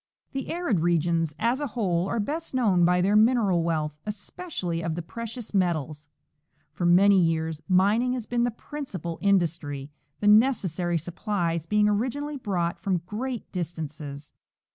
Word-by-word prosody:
The 270 Hz, -1 st, -4 dB
arid 335 Hz, -, 0 dB
regions, 165 Hz, -2 st, +1 dB
as 240 Hz, +5 st, +1 dB
a 290 Hz, -, -1 dB
whole, 190 Hz, -7 st, 0 dB
are 230 Hz, -, -1 dB
best 300 Hz, +7 st, -3 dB
known 195 Hz, -9 st, +3 dB
by 180 Hz, +1 st, +3 dB
their 200 Hz, +3 st, +2 dB
mineral 215 Hz, -5 st, +4 dB
wealth, 155 Hz, -2 st, -1 dB
especially 205 Hz, -, -4 dB
of 165 Hz, -1 st, -2 dB
the 170 Hz, -, -4 dB
precious 230 Hz, +6 st, -7 dB
metals. 155 Hz, -6 st, -1 dB, 0.6 s
For 175 Hz, -, -1 dB
many 195 Hz, +3 st, +6 dB
years 160 Hz, -2 st, 0 dB
min 195 Hz, +5 st, +4 dB
ing 250 Hz, 0 st, 0 dB
has 245 Hz, -4 st, -3 dB
been 240 Hz, 0 st, 0 dB
the 245 Hz, -, +2 dB
principal 215 Hz, -, -6 dB
industry, 165 Hz, -8 st, 0 dB, 0.3 s
the 205 Hz, -, 0 dB
necessary 195 Hz, -, +3 dB
supjslies 170 Hz, -1 st, -2 dB
being 210 Hz, 0 st, +4 dB
originally 260 Hz, +8 st, -1 dB
brought 180 Hz, -8 st, -2 dB
from 180 Hz, -4 st, -1 dB
great 235 Hz, +5 st, -5 dB
distances. 155 Hz, -4 st, -6 dB
185 Hz, 150 wpm, -26 LUFS, 165-230 Hz, 0.6 s, many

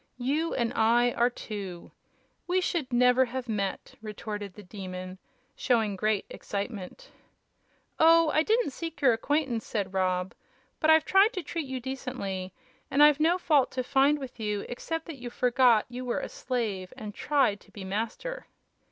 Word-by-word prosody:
You 290 Hz, +7 st, -1 dB
and 235 Hz, -2 st, 0 dB
I 235 Hz, +2 st, +3 dB
are 240 Hz, +1 st, +2 dB
two. 200 Hz, -7 st, -7 dB, 0.6 s
We 365 Hz, +1 st, +2 dB
should 335 Hz, -7 st, -2 dB
never 250 Hz, +1 st, +4 dB
had 255 Hz, +1 st, -5 dB
met!" 200 Hz, -3 st, -3 dB
retorted 210 Hz, -2 st, -6 dB
the 210 Hz, -, -11 dB
Demon, 185 Hz, -1 st, -7 dB, 0.4 s
showing 225 Hz, -5 st, +1 dB
great 215 Hz, +1 st, 0 dB
excitement. 205 Hz, -, -6 dB, 0.9 s
"Oh, 330 Hz, 0 st, +6 dB
I 310 Hz, -, +3 dB
didn't 440 Hz, 0 st, +1 dB
seek 330 Hz, +3 st, -6 dB
your 265 Hz, -5 st, +5 dB
acquaintance," 250 Hz, -1 st, 0 dB
said 195 Hz, -3 st, -3 dB
Rob. 185 Hz, -1 st, 0 dB, 0.5 s
"But 315 Hz, -, +2 dB
I've 315 Hz, 0 st, +6 dB
tried 395 Hz, +5 st, +5 dB
to 370 Hz, -, -4 dB
treat 320 Hz, -1 st, -4 dB
you 260 Hz, -1 st, -4 dB
decently, 245 Hz, -8 st, -5 dB, 0.4 s
and 290 Hz, -, +5 dB
I've 295 Hz, -1 st, +6 dB
no 330 Hz, +4 st, +3 dB
fault 300 Hz, -7 st, +3 dB
to 255 Hz, -, -1 dB
find 275 Hz, +3 st, +3 dB
with 265 Hz, -4 st, -9 dB
you 210 Hz, -2 st, -2 dB
except 325 Hz, +6 st, -4 dB
that 310 Hz, -5 st, -8 dB
you 245 Hz, -, -5 dB
forgot 245 Hz, -2 st, +3 dB
you 250 Hz, +1 st, -7 dB
were 245 Hz, -1 st, -1 dB
a -, -, -5 dB
slave 215 Hz, -8 st, -3 dB
and 210 Hz, -1 st, -7 dB
tried 255 Hz, -5 st, +1 dB
to -, -, -22 dB
be 200 Hz, -, -9 dB
a -, -, -7 dB
master." 230 Hz, -, -4 dB
245 Hz, 170 wpm, -28 LUFS, 210-295 Hz, 0.9 s, Oh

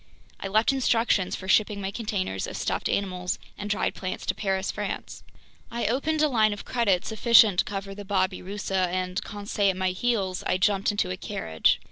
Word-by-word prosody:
I -, -, -4 dB
left 215 Hz, +6 st, +3 dB
instructions 230 Hz, -7 st, +2 dB
for 190 Hz, -, -8 dB
shipping 210 Hz, +1 st, +3 dB
my 195 Hz, 0 st, -3 dB
containers 200 Hz, -, -2 dB
of -, -, -6 dB
stuffed -, -, -1 dB
animals 180 Hz, -2 st, -1 dB, 0.2 s
and 205 Hz, 0 st, -6 dB
dried 210 Hz, -, 0 dB
plants 185 Hz, -1 st, -5 dB
to -, -, +1 dB
Paris, 190 Hz, -2 st, -1 dB
France. 205 Hz, -1 st, -5 dB, 0.5 s
I 235 Hz, 0 st, -3 dB
opened 300 Hz, +6 st, +1 dB
a -, -, +5 dB
line 220 Hz, -6 st, +3 dB
of 205 Hz, -, -8 dB
credit 205 Hz, -7 st, +1 dB
sufficient 220 Hz, -3 st, +5 dB
to -, -, +3 dB
cover 195 Hz, -1 st, -5 dB
the 205 Hz, +1 st, -8 dB
babirusa 190 Hz, 0 st, -1 dB
and, 180 Hz, +1 st, -2 dB
Conseil 205 Hz, -1 st, -1 dB
at 185 Hz, -, -1 dB
my 185 Hz, 0 st, +1 dB
heels, 190 Hz, -2 st, -1 dB
I -, -, +2 dB
jumped 195 Hz, +1 st, +2 dB
into 205 Hz, -, 0 dB
a 95 Hz, -, -3 dB
carriage. 80 Hz, -1 st, 0 dB
200 Hz, 185 wpm, -26 LUFS, 185-215 Hz, 0.5 s, a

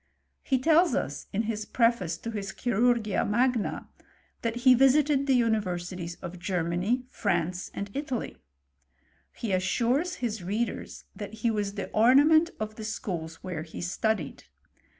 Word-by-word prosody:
He 265 Hz, -, +1 dB
tells 325 Hz, +6 st, +4 dB
us, -, -, -3 dB
in 210 Hz, +3 st, 0 dB
his 215 Hz, -1 st, -2 dB
pre 230 Hz, +1 st, +3 dB
face 180 Hz, -8 st, -5 dB
to 230 Hz, -, -6 dB
his 200 Hz, -3 st, -5 dB
Chirurgia 235 Hz, -2 st, +1 dB
Magna, 240 Hz, +1 st, 0 dB, 0.5 s
that 230 Hz, 0 st, -1 dB
he 255 Hz, -, +9 dB
visited 275 Hz, +2 st, +4 dB
the 260 Hz, -2 st, +4 dB
unis^ 225 Hz, -2 st, +2 dB
versities 175 Hz, -2 st, -5 dB
of 175 Hz, +1 st, -7 dB
Germany, 180 Hz, +7 st, -1 dB
France, 180 Hz, -6 st, -1 dB
and 200 Hz, 0 st, -5 dB
Italy. 270 Hz, -4 st, -4 dB, 1.0 s
He 225 Hz, -, -3 dB
assures 240 Hz, -, +1 dB
his 225 Hz, -5 st, -3 dB
readers, 210 Hz, +6 st, -3 dB
that 205 Hz, -1 st, -7 dB
he 230 Hz, -, +4 dB
was 205 Hz, -2 st, -2 dB
the 200 Hz, -, -5 dB
ornament 290 Hz, +9 st, +5 dB
of 215 Hz, 0 st, -5 dB
the 220 Hz, -, -6 dB
schools 175 Hz, -7 st, -5 dB
where 180 Hz, -4 st, -4 dB
he 160 Hz, 0 st, -9 dB
studied. 180 Hz, -2 st, -2 dB
215 Hz, 150 wpm, -28 LUFS, 185-250 Hz, 1.0 s, he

